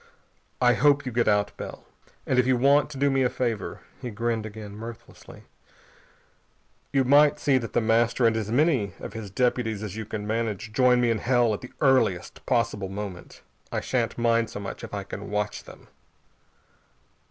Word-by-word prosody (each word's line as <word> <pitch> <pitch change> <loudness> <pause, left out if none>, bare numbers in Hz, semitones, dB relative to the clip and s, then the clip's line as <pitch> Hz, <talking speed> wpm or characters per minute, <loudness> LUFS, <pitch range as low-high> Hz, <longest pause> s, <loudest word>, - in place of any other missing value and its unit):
I 125 -1 +5
hope 145 +1 +3
you 130 - -3
get 120 0 +1
out, 105 -1 +2
Bell.... - - -8 0.4
And 130 - +2
if 125 - +3
you 130 -1 +3
want 140 +4 +4
to 145 - -8
do 140 +1 +2
me 135 0 +2
a 125 - +3
favor," 115 -7 -3 0.2
he 125 - -4
grinned 115 0 -2
again, 105 -1 -9
mirthlessly 115 +1 -11 1.5
"you 135 -1 +3
might 145 +3 +5
see 135 -3 +2
that 115 -2 -7
The 120 - +2
Master 115 +2 +2
and 115 -1 +4
as 110 -1 -2
many 125 - +2
of - - -8
his 110 -3 -6
deputies 110 0 0
as 105 -2 -5
you 110 0 -5
can 105 0 -5
manage 110 -1 -3
join 125 0 +4
me 120 -1 +3
in 110 - 0
hell 120 -2 +2
at 105 - -4
the 125 - -10
earliest 130 -10 +2
possible 115 -5 0
moment. 95 -2 -7 0.3
I - - -1
shan't - - -1
mind 115 -1 +2
so - - -7
much 100 -1 -7
if - - -7
I 100 -1 -4
can 100 +1 -8
watch 105 0 -2
them." - - -14
115 Hz, 185 wpm, -26 LUFS, 105-125 Hz, 1.5 s, I